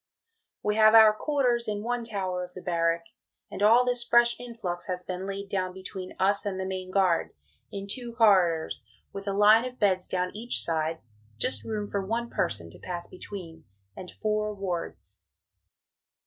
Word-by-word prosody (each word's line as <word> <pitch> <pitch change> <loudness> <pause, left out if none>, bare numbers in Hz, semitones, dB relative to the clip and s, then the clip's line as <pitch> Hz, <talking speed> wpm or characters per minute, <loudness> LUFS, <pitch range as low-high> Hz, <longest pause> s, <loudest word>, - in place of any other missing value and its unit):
We 210 +1 0
have 215 0 +7
our 220 -1 +9
Quarters 245 -2 0
in 210 -1 -2
one 240 +1 -2
Tower 190 -5 -3
of 180 0 -10
the 185 - -7
Barrack, 170 -1 0 0.5
and - - -6
all 230 +4 +6
this 245 -1 +1
fresh 235 0 +4
influx 220 -8 -5
has 180 -1 -3
been 185 +1 -5
laid 200 0 -5
down 185 -2 -2
between 190 0 -8
us 200 +2 +2
and 195 -3 -3
the 190 - -2
Main 185 -1 -4
Guard, 185 -3 +1 0.4
in 200 -1 -5
two 235 +2 -5
Corridors, 185 -8 +3 0.3
with 195 0 -7
a 200 - 0
line 210 +3 +6
of 250 0 -6
Beds 185 -3 +1
down 180 +1 -2
each 235 +3 -1
side, 160 0 -1 0.4
just 255 - -1
room 210 -2 -3
for 200 -1 -2
one 235 +4 -3
person 85 -6 -1
to - - -14
pass 175 -1 -5
between, 175 -4 -9 0.3
and 180 - -8
four 215 0 -2
wards. 175 - -5
200 Hz, 175 wpm, -27 LUFS, 180-220 Hz, 0.5 s, our